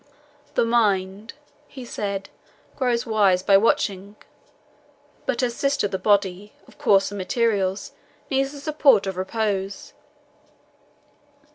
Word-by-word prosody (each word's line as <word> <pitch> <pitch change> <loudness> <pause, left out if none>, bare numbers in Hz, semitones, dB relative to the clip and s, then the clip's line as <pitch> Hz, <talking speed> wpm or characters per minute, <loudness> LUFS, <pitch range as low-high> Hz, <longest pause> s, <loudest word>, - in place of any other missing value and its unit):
"The - - +3
mind," 210 -2 0 0.3
he 260 -3 -10
said, 200 -4 -4 0.5
"grows 245 -3 0
wise 200 -5 +2
by 195 - +4
watching, 200 -1 +1 1.1
but 245 -1 0
her 250 - +1
sister 275 -2 0
the 190 -1 -4
body, 200 0 0
of - - -20
coarser 195 0 +3
materials, 200 -1 -1 0.4
needs 270 0 0
the 290 - -10
support 280 -8 +3
of 190 -1 -3
repose. 195 0 -3
205 Hz, 110 wpm, -23 LUFS, 195-235 Hz, 1.1 s, by